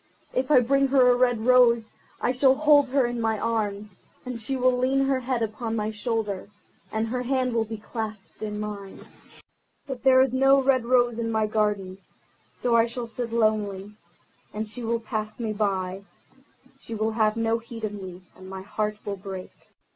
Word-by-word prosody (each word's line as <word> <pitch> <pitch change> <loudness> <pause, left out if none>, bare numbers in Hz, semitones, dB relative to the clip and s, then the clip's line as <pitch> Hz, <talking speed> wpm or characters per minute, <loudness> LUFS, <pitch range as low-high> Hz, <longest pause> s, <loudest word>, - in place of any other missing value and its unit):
If 255 +2 -1
I 275 -4 +6
bring 275 +3 +2
her 260 -2 +5
a - - +4
red 245 -3 +1
rose, 240 -3 +5 0.3
I - - +1
shall 265 +1 +4
hold 290 -1 +4
her 270 -1 +2
in 240 0 -3
my 220 -1 +1
arms, 210 -3 -3 0.3
and 250 -2 -5
she 250 +5 -3
will 255 0 +3
lean 260 +2 +1
her 270 -1 +1
head 250 -2 -1
upon 225 +1 -3
my 215 0 -1
shoulder, 210 -3 -3 0.4
and 220 +1 -1
her 250 +1 -2
hand 255 -1 0
will 225 -1 +1
be 220 0 -6
clasped 215 -1 -7
in 210 -1 -4
mine. 205 -2 -7 0.8
But 265 -3 -6
there 260 -1 +6
is 260 -1 +2
no 270 +1 +5
red 260 -3 +2
rose 240 -2 +3
in 230 0 -1
my 220 -1 +1
garden, 205 -3 -1 0.5
so 240 -1 0
I 230 0 +5
shall 235 +1 -5
sit 235 0 -5
lonely, 210 -3 0 0.6
and 215 +1 -4
she 235 +4 -9
will 230 0 -1
pass 215 -1 -5
me 225 -2 -2
by. 195 -2 -1 0.8
She 230 - -7
will 220 +1 0
have 220 -1 +1
no 225 0 +1
heed 230 0 -10
of 210 -1 -2
me, 185 -2 -8
and 185 0 -12
my 190 0 -7
heart 210 +1 -2
will 200 -1 -3
break." 190 -1 -7
225 Hz, 190 wpm, -25 LUFS, 210-250 Hz, 0.8 s, I